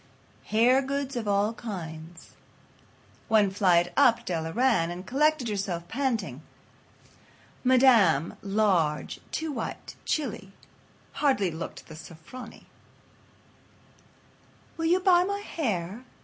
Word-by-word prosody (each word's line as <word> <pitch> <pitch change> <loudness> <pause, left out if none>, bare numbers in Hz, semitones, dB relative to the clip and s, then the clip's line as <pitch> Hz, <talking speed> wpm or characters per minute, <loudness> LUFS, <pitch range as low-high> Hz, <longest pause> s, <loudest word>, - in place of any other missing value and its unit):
Hair 240 +5 +4
Goods 275 0 -3
of 230 -3 -3
All 205 +2 +1
Kinds." 170 -7 -8 1.0
One 210 -3 +3
flight 175 -3 +2
up 230 -1 +4
Della 165 -2 -3
ran, 230 -7 +2
and 175 +2 -7
collected 295 +3 +1
herself, 190 -5 -3
panting. 225 - -2 1.2
Madame, 240 - +4
large, 195 -7 0
too 320 -1 -3
white, 235 -6 -6
chilly, 210 -10 -3 0.7
hardly 255 - +2
looked 160 +1 -7
the 160 - -11
"Sofronie." 170 +9 -11 2.1
"Will 325 - -3
you 350 +3 +3
buy 360 -2 +4
my 400 +2 -3
hair?" 220 - -3
215 Hz, 105 wpm, -27 LUFS, 175-260 Hz, 2.1 s, Hair